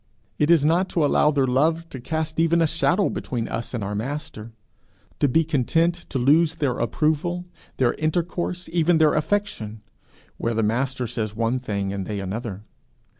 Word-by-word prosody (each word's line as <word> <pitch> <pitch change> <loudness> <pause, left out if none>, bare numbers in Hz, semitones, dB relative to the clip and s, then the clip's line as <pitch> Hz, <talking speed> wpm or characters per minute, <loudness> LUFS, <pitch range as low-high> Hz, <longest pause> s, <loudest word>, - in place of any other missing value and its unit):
it 150 - +2
is 165 -4 +5
not 175 +4 +2
to 165 -4 +1
allow 150 - +4
their 140 -3 +2
love 160 +6 +1
to 130 - -6
cast 160 +5 -3
even 165 +1 +3
a 165 - +4
shadow 170 +5 +2
between 120 -3 -3
us 115 0 -4
and 120 -5 -3
our 100 +1 -3
Master; 115 -1 -5 0.7
to 145 - +4
be 160 +5 +3
content 160 +3 +1 0.2
to - - -2
lose 155 +6 +4
their 140 -6 -1
approval, 160 +8 0 0.3
their 125 -2 +2
intercourse, 175 +3 -2
even 170 0 +3
their 155 -1 +4
affection, 150 - -2 0.6
where 115 0 -1
the 115 - +1
Master 125 +4 0
says 110 -2 -3
one 115 +3 0
thing 100 -5 -3
and 95 -2 -4
they 105 -2 -3
another. 100 +1 -5
145 Hz, 175 wpm, -23 LUFS, 115-165 Hz, 0.7 s, is